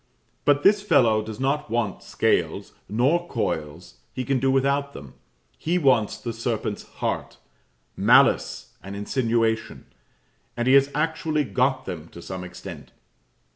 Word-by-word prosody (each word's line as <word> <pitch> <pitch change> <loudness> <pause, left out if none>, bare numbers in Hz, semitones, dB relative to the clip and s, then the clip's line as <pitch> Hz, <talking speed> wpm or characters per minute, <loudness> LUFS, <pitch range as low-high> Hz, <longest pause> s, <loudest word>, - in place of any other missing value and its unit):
But 145 0 +3
this 205 +1 +5
fellow 120 - +3
does 110 0 -8
not 140 +1 -1
want 115 -3 -1
scales, - - -1 0.2
nor 140 +11 +1
coils; 75 - -4
he 130 - -3
can 135 -2 +1
do 135 +2 +1
without 140 +1 +1
them; 70 -3 -10 0.5
he 170 +3 0
wants 130 - +2
the 115 - -5
serpent's 110 -2 -3
heart - - -4 0.6
malice - - +3
and 95 +3 -8
insinuation; 115 +1 -1 0.7
and 120 +1 -1
he 130 - +5
has 140 0 +6
actually 155 0 0
got 130 +3 0
them 85 -4 -6
to 85 - -10
some 95 -1 -6
extent. 90 -4 -10
120 Hz, 135 wpm, -24 LUFS, 105-140 Hz, 0.7 s, has